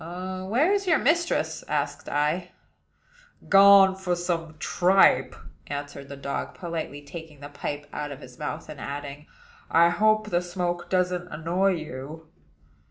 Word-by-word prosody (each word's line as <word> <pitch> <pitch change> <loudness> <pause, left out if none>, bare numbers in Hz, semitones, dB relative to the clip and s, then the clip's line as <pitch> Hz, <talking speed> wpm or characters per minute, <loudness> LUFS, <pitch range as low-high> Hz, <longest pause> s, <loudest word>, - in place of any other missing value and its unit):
"Where 185 - -1
is 395 -1 -1
your 325 -3 +5
mistress?" 340 +6 0
asked - - -2
I. 150 +5 -1 1.0
"Gone 195 -1 +8
for 190 -2 -1
some 170 -2 -3
tripe," 185 +3 +3 0.3
answered 145 -1 -6
the 140 - -8
dog, 140 0 -4
politely 165 -4 -5
taking 160 -1 -10
the 145 +1 -9
pipe 145 0 -5
out 150 0 -4
of 140 - -8
his 125 -2 -13
mouth, 150 - -5
and 150 -2 -9
adding, 145 +1 -6 0.4
"I 170 +1 +5
hope 215 +2 +2
the 175 0 +2
smoke 175 -1 -3
doesn't 180 -1 0
annoy 180 +4 0
you." 155 0 -7
170 Hz, 140 wpm, -26 LUFS, 145-190 Hz, 1.0 s, Gone